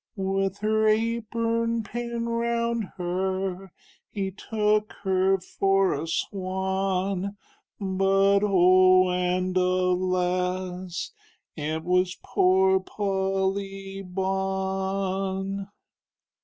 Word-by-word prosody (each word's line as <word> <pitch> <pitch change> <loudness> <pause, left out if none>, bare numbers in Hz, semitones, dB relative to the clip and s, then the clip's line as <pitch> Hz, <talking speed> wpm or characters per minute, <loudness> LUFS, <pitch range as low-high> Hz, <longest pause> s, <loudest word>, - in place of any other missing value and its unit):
With 195 0 -1
her 215 0 +2
apurn 230 +1 0
pinned 235 +2 -4
round 235 -1 0
her, 185 +1 -2 0.4
He 195 -2 -3
took 210 +1 0
her 190 0 +3
for 195 +1 +1
a 150 +3 -3
swan, 190 +2 -2 0.4
But 195 0 +3
oh 185 -1 +5
and 180 +1 0
a 185 - +4
las, 180 0 -1 0.4
it 155 +1 -3
was 180 +1 +1
poor 190 +1 +3
Pol 190 -1 -1
ly 195 0 -6
Bawn. 190 +1 -2
190 Hz, 85 wpm, -26 LUFS, 185-200 Hz, 0.4 s, oh